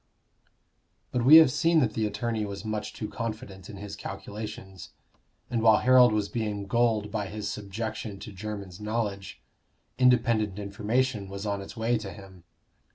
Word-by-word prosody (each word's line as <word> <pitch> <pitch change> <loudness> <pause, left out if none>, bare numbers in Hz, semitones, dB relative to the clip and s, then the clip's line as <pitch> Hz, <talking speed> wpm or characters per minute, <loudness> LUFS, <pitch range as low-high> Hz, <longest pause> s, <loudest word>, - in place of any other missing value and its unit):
But 125 - 0
we 140 +6 +9
have 160 -5 +9
seen 165 +4 +3
that 115 -5 +1
the 110 -1 0
attorney 110 +1 -2
was 100 +1 -6
much 105 0 -3
too 105 - -5
confident 105 -4 -6
in 100 - -8
his 100 0 -7
calculations. 100 -2 -8 0.5
And 115 -2 -1
while 110 -1 +6
Harold 125 -2 +6
was 105 -1 0
being 105 -3 -3
gulled 110 -1 +1
by 105 -2 -2
his 105 +1 -4
subjection 105 +1 -5
to - - -8
Jermyn's 100 -2 -7
knowledge, 105 -3 -3 0.6
independent 115 -5 +3
information 105 +2 -1
was 100 +1 -6
on 100 -1 -2
its 100 - -10
way 115 +1 +1
to 100 -3 -7
him. 95 -4 -13
105 Hz, 160 wpm, -27 LUFS, 100-115 Hz, 0.6 s, we